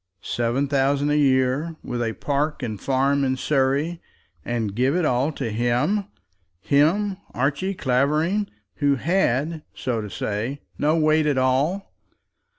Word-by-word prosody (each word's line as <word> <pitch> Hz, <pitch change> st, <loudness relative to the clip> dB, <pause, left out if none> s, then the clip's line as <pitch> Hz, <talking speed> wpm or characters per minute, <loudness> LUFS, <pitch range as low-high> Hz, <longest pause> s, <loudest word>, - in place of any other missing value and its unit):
Seven 120 Hz, +4 st, 0 dB
thousand 140 Hz, +1 st, +1 dB
a -, -, +2 dB
year, 135 Hz, +3 st, +2 dB
with 120 Hz, -1 st, -3 dB
a 115 Hz, -1 st, -1 dB
park 145 Hz, +2 st, -2 dB
and 110 Hz, -5 st, -4 dB
farm 140 Hz, +1 st, +1 dB
in 130 Hz, -1 st, 0 dB
Surrey, 145 Hz, +5 st, 0 dB, 0.4 s
and 115 Hz, -2 st, -2 dB
give 130 Hz, +7 st, +1 dB
it 180 Hz, -2 st, +1 dB
all 130 Hz, +3 st, +1 dB
to 125 Hz, -6 st, -3 dB
him, 120 Hz, -, +1 dB, 0.5 s
him, 170 Hz, -, +2 dB, 0.2 s
Archie 145 Hz, +10 st, 0 dB
Clavering, 150 Hz, +10 st, +1 dB, 0.3 s
who 145 Hz, -2 st, +2 dB
had, 155 Hz, 0 st, 0 dB
so 120 Hz, -4 st, -2 dB
to 105 Hz, -, -6 dB
say, 110 Hz, +9 st, -3 dB, 0.2 s
no 150 Hz, +2 st, +2 dB
weight 155 Hz, -1 st, +3 dB
at 145 Hz, -3 st, +1 dB
all! 135 Hz, +9 st, +1 dB
140 Hz, 140 wpm, -23 LUFS, 125-155 Hz, 0.5 s, weight